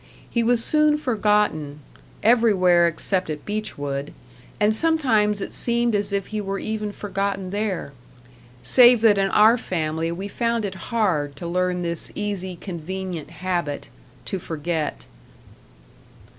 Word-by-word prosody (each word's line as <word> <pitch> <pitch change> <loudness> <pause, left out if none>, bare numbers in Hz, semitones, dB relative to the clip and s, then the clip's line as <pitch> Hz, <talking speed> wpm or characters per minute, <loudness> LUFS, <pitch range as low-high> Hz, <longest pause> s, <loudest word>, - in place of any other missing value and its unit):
He 235 - 0
was 230 0 +2
soon 305 -1 +3
forgotten 210 - 0 0.4
everywhere 195 -7 +4
except 180 +2 -1
at 150 -1 -5
Beechwood; 145 -10 -4 0.5
and 210 +1 +3
sometimes 220 -8 +2
it - - -5
seemed 235 -1 0
as 205 0 0
if 200 -1 -2
he 215 - -1
were 195 0 -3
even 215 0 -3
forgotten 195 -2 -3
there. 200 -8 -3 0.7
Save 245 -2 +7
that 210 -3 +5
in 195 0 +2
our 220 +4 +5
family 165 -3 -2
we 190 +4 -5
found 230 +1 -1
it 190 -3 -7
hard 175 - 0
to 170 - -8
learn 180 +1 -1
this 170 -1 0
easy, 195 -3 -3
convenient 180 -1 -6
habit 170 -3 -3 0.4
to 190 - -3
forget. 155 - -3
195 Hz, 130 wpm, -23 LUFS, 170-215 Hz, 0.7 s, Save